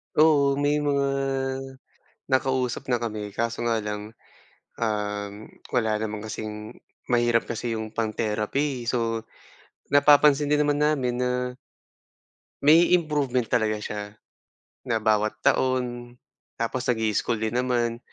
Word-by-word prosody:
Oo, 145 -3 +5
may 145 +1 +1
mga 140 -2 +1 1.2
nakausap 130 -2 0
na 120 -2 0
kami, 105 -3 -4
kaso 115 +1 -2
nga 115 -2 +1
lang, 105 +1 -5 0.7
um, 105 -1 -2 0.2
wala 110 -3 0
naman 110 -1 -3
kasing 105 0 -6 0.3
mahirap 120 -1 +2
kasi 115 0 -3
'yong 110 0 -6
pang-therapy, 115 +4 -1
so 115 -2 0 0.7
napapansin 145 0 +5
din 150 +1 +2
naman 145 0 +1
namin 145 -5 +1
na 125 0 -1 1.1
may 165 +5 +6
improvement 145 -7 0
talaga 110 -2 +2
siya, 105 0 -5 0.9
na 115 -2 0
bawat 110 0 +2
taon, 125 -2 0 0.4
tapos 125 +2 -2
nag-i-school 110 -1 +1
din 110 0 -2
naman. 120 -2 0
120 Hz, 115 wpm, -25 LUFS, 110-135 Hz, 1.2 s, may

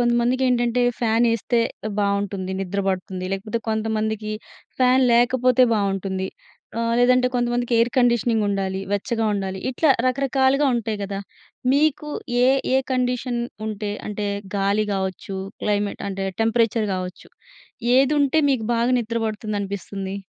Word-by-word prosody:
కొంతమందికేంటంటే 240 0 +2 0.2
ఫ్యానేస్తే 230 0 +2 0.4
బావుంటుంది. 200 -2 -1
నిద్ర 195 +1 -2
బడుతుంది. 185 -1 -3
లేకపోతే 215 +4 -2
కొంతమందికి 220 -1 -1 0.5
ఫ్యాన్ 255 +1 +4
లేకపోతే 250 +1 +4
బావుంటుంది. 195 -2 -1 0.5
ఆహ్, 230 0 0
లేదంటే 250 +1 +4
కొంతమందికి 240 0 0
ఎయిర్ 235 +1 +3
కండిషనింగ్ 235 -3 +2
ఉండాలి. 195 -1 -1
వెచ్చగా 225 +3 0
ఉండాలి. 190 -1 -3
ఇట్లా 285 +4 +2 0.2
రకరకాలుగా 270 +2 +2
ఉంటాయి 220 -2 -2
గదా! 200 0 -4 0.5
మీకు 300 +1 +2 0.4
ఏ - - +5 0.3
ఏ - - +6
కండిషన్ 250 -1 0 0.3
ఉంటే 210 -1 -3 0.2
అంటే 210 0 -3 0.3
గాలి 200 +2 +1
గావచ్చు 190 0 -3 0.3
క్లైమేట్ 205 -1 -1
అంటే 195 0 -3 0.2
టెంపరేచర్ 225 -1 +2
గావచ్చు. 185 0 -6 0.7
ఏదుంటే 285 +2 +3
మీకు 240 -5 0
బాగా 235 +2 +2
నిద్ర 230 0 -4
పడుతుంది 215 -1 -3
అనిపిస్తుంది? 195 0 -5
225 Hz, 120 wpm, -22 LUFS, 200-245 Hz, 0.7 s, ఏ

